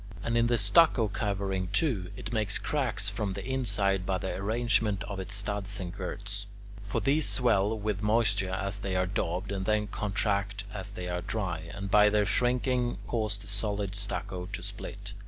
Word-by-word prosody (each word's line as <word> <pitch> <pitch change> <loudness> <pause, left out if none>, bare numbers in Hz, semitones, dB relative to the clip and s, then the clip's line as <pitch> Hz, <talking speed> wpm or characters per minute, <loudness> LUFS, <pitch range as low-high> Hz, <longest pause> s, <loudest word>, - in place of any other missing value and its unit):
And, 115 - 0
in 115 0 +4
the 120 0 +3
stucco 110 +2 +5
covering, 95 -2 -1
too, 100 - 0
it 110 +3 -6
makes 105 -3 +3
cracks 120 -10 0
from 100 -2 -2
the - - -5
inside 105 -7 +1
by 95 0 0
the 95 - -3
arrangement 105 0 +1
of 100 -2 -5
its 95 +2 -4
studs 100 0 -1
and 90 -2 -5
girts. 100 +2 -4 0.4
For 105 - 0
these 140 +8 +2
swell 110 -3 +3
with 105 -2 -2
moisture 105 -3 +2
as 100 +2 -2
they 100 -2 -2
are 90 0 +2
daubed, 90 +1 -2
and 95 -1 -2
then 105 0 +2
contract 100 0 -1
as 100 -1 -4
they 90 -2 -5 0.2
dry, 90 -7 -2
and, 100 -1 -5
by 105 0 +7
their 105 0 +3
shrinking, 125 +2 +1
cause 110 -3 -1
the 105 +1 -13
solid 100 -1 -1
stucco 95 -3 -4
to 100 - -6
split. - - -5
100 Hz, 175 wpm, -29 LUFS, 95-110 Hz, 0.4 s, by